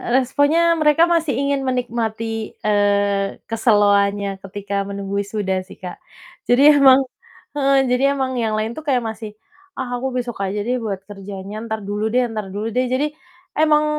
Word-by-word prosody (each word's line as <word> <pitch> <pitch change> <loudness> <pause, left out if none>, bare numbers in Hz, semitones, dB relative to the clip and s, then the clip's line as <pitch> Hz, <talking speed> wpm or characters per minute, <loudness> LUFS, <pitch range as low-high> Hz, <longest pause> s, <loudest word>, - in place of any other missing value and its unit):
E - - -7
responnya 285 +7 +3
mereka 300 +2 +5
masih 330 -7 +1
ingin 280 0 0
menikmati, 225 -3 -3
eee, 200 -1 +1
keseloannya 205 -3 +2
ketika 200 +1 -4
menunggu 200 0 -3
wisuda 200 -2 -2
sih, - - -12
Kak, 180 -1 -9 0.5
jadi 285 +4 +6
emang 270 0 +7 0.5
heeh, 275 -2 +3
jadi 265 +2 +2
emang 265 -1 -1
yang 220 -2 0
lain 215 +1 -2
tuh 275 - -7
kayak 250 -4 +2
masih, 220 -1 -6 0.4
"Ah, 255 -2 -4
aku 265 - -1
besok 240 -3 -4
aja 200 +1 -2
deh, 250 +2 -1
buat 200 -4 -4
kerjanya, 200 +1 -8
entar 220 -2 -5
dulu 205 +2 -2
deh 250 +2 +2
entar 215 -4 -4
dulu 210 +4 -4
deh." 255 +2 0
Jadi 280 +4 0 0.4
emang 305 -1 +3
225 Hz, 165 wpm, -20 LUFS, 205-265 Hz, 0.5 s, emang